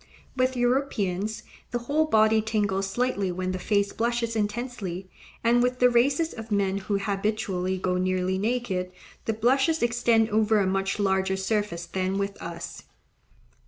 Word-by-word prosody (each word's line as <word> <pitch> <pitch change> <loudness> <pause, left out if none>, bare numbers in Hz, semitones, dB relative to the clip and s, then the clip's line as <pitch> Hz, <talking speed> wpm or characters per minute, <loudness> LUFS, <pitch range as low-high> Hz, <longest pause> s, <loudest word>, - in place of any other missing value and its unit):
With 255 0 +1
Europeans 220 -5 0 0.3
the 240 - -1
whole 305 +4 +2
body 220 -5 +4
tingles 205 -3 0
slightly 205 -3 0
when 185 +1 -2
the 185 - -3
face 200 0 +1
blushes 235 0 -1
intensely; 205 -4 -3 0.4
and 235 +1 +4
with 250 +1 +1
the 250 0 +5
races 275 +7 +2
of 225 -1 -9
men 200 -1 +1
who 200 +1 -1
habitually 195 -2 -1
go 180 0 0
nearly 185 0 0
naked, 205 -5 -1 0.3
the 225 - 0
blushes 265 +8 +2
extend 230 -2 +2
over 220 0 +3
a 200 - +2
much 195 +1 0
larger 190 -1 +1
surface 190 -3 -1
than 190 +1 -2
with 200 0 -3
us. 170 0 -7
210 Hz, 150 wpm, -26 LUFS, 190-240 Hz, 0.4 s, the